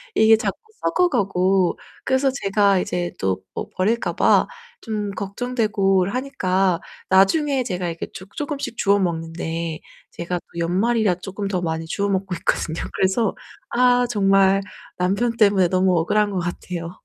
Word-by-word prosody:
이게 220 0 +6
자꾸 220 - -2 0.2
썩어가고. 195 - +2 0.3
그래서 265 +1 +2
제가 195 -1 +3
이제 175 -1 -2
또 95 -1 -1
뭐 - - -5
버릴까 220 +5 0
봐 - - +4 0.3
좀 210 -3 -3
걱정되고 200 -3 0
하니까 190 -8 0 0.3
나중에 260 +8 +3
제가 180 -4 -3
이렇게 165 0 -5
주 190 -1 -9
쪼금씩 290 -5 -4
주워먹는데 165 -4 -1 0.3
제가 175 +1 -3
또 170 - -10
연말이라 195 +3 +1
조금 195 +2 -5
더 185 -2 -1
많이 160 -1 -2
주워 200 +4 -1
먹고 190 -2 -1
있거든요. 165 -1 -2
그래서 190 +3 +1 0.4
아 245 0 +4
정말 195 -3 +3 0.4
남편 200 +6 +1
때문에 200 -5 +4
너무 185 -1 +2
억울한 205 +5 +2
것 195 - -3
같아요. 175 -1 -5
195 Hz, 305 characters per minute, -22 LUFS, 180-220 Hz, 0.4 s, 이게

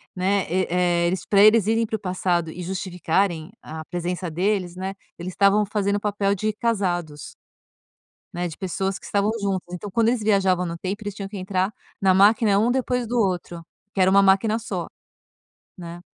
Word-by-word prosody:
né, 190 +1 +1
e, 185 +1 0
eh, 175 -1 +2
eles 185 +2 -2
pra 200 -1 +4
eles 215 -1 +6
irem 225 +1 +2
para 220 - -3
o - - -4
passado 180 -3 -1
e 180 - -8
justificarem 180 -1 -1
a 160 0 -8
presença 175 +1 -3
deles, 180 +1 -1
né, 190 +1 -5 0.2
eles 180 +2 -5
estavam 200 +2 +4
fazendo 200 -1 0
o - - -3
papel 200 -1 0
de 215 +3 -1
casados, 180 -9 -2 1.0
né, 175 0 -2
de 160 - -8
pessoas 190 +1 -2
que - - -14
estavam 205 +1 +1
juntas. 190 -3 -2
Então 180 +3 -6
quando 225 +3 +2
eles 240 -1 0
viajavam 190 -4 +2
no 170 0 -5
tempo, 195 +5 -4
eles 205 -1 -5
tinham 195 -1 -6
que 200 - -7
entrar 185 +2 -1 0.3
na 190 -1 +4
máquina 205 +1 +4
um 225 +3 +2
depois 250 -1 -1
do 245 +2 -2
outro, 180 -4 -2 0.3
que 195 - -2
era 185 0 +4
uma 200 +1 +6
máquina 195 +3 +3
só, 225 - -4 0.9
né. 170 -1 -8
190 Hz, 190 wpm, -23 LUFS, 180-205 Hz, 1.0 s, eles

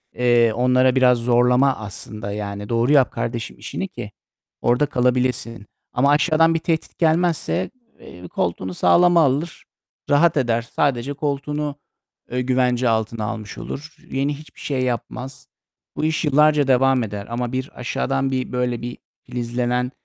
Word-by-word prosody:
eee, 120 -2 +3
onlara 125 +1 +3
biraz 125 -1 +5
zorlama 125 +3 +3
aslında. 105 -1 -7
Yani, 100 0 -5
"Doğru 115 +3 +2
yap 135 -4 +5
kardeşim 115 -1 -4
işini 195 - -4
ki 120 - -8 0.5
orada 125 +4 +3
kalabilesin." 125 -4 0 0.3
Ama 135 +3 +3
aşağıdan 160 +2 +4
bir 165 - 0
tehdit 160 0 -2
gelmezse, 165 0 +1 0.3
eee, 90 +1 -11
koltuğunu 90 +2 -2
sağlama 170 - +4
alır, 145 +4 -1 0.5
rahat 155 +3 +4
eder. 120 -4 +1
Sadece 130 +2 -1
koltuğunu, 145 +1 -3 0.6
eee, 125 +1 -1
güvence 125 -1 +1
altına 110 0 -1
almış 105 0 -6
olur. 150 +3 -7 0.2
Yeni 140 +2 -1
hiçbir 155 +1 -15
şey 135 -3 -2
yapmaz. 125 +2 -4 0.5
Bu 155 - -1
iş 160 +1 0
yıllarca 150 0 +4
devam 130 -1 +3
eder. 105 -2 -6
Ama 120 0 -3
bir 130 +1 -3
aşağıdan 135 +2 -1
bir 130 -1 -2
böyle 125 -2 -1
bir 120 +1 -6 0.3
filizlenen 125 +1 -2
125 Hz, 140 wpm, -21 LUFS, 120-145 Hz, 0.6 s, biraz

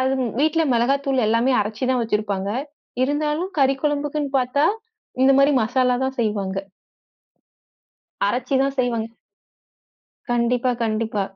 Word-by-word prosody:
அது 260 +1 +1
ம் 235 -4 -2
வீட்டுல 315 +2 +2
மொளகாத்தூளு 265 +1 +1
எல்லாமே 230 +4 +2
அரைச்சுதான் 245 +5 -1
வச்சிருப்பாங்க. 205 -3 -2 0.5
இருந்தாலும் 300 +5 -1
கறி 270 0 +4
குழம்புக்குன்னு 295 -1 -1
பாத்தா, 255 +4 +1 0.6
இந்த 270 +1 +6
மாரி 280 +1 +5
மசாலா 250 +2 +1
தான் 265 0 -3
செய்வாங்க. 200 -3 -1 1.7
அரைச்சுதான் 265 +5 0
செய்வாங்க. 235 -3 0 1.2
கண்டிப்பா, 240 +1 +1
கண்டிப்பா. 215 -2 -1
255 Hz, 105 wpm, -22 LUFS, 225-275 Hz, 1.7 s, இந்த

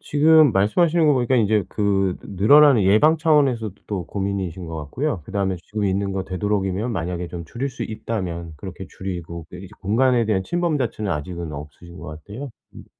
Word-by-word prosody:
지금 155 -1 +5
말씀하시는 155 - +3
거 150 - +5
보니까 130 0 +1
인제 105 -3 +2
그 95 -3 0
느 95 -1 -8
늘어나는 145 -2 +7
예방 130 +12 +5
차원에서도 135 - +2
또 95 -5 -4
고민이신 95 -3 -3
것 80 - -6
같고요. 95 - -3
그다음에 95 -2 -1
지금 105 -1 -3
있는 100 0 0
거 95 -1 -2
되도록이면 100 +3 -1
만약에 90 -1 -3
좀 85 -1 -7
줄일 130 +10 -4
수 130 - -7
있다면 90 -7 -4
그렇게 95 +3 -8
줄이고 85 -3 -6
그 90 - -9
이제 95 0 -10
공간에 120 +4 +2
대한 105 -3 0
침범 175 -3 0
자체는 110 -5 -2
아직은 85 +2 -5
없으신 75 +5 -10
것 - - -9
같아요. 105 - -8 0.2
음 - - -11
100 Hz, 410 characters per minute, -22 LUFS, 90-125 Hz, 0.2 s, 늘어나는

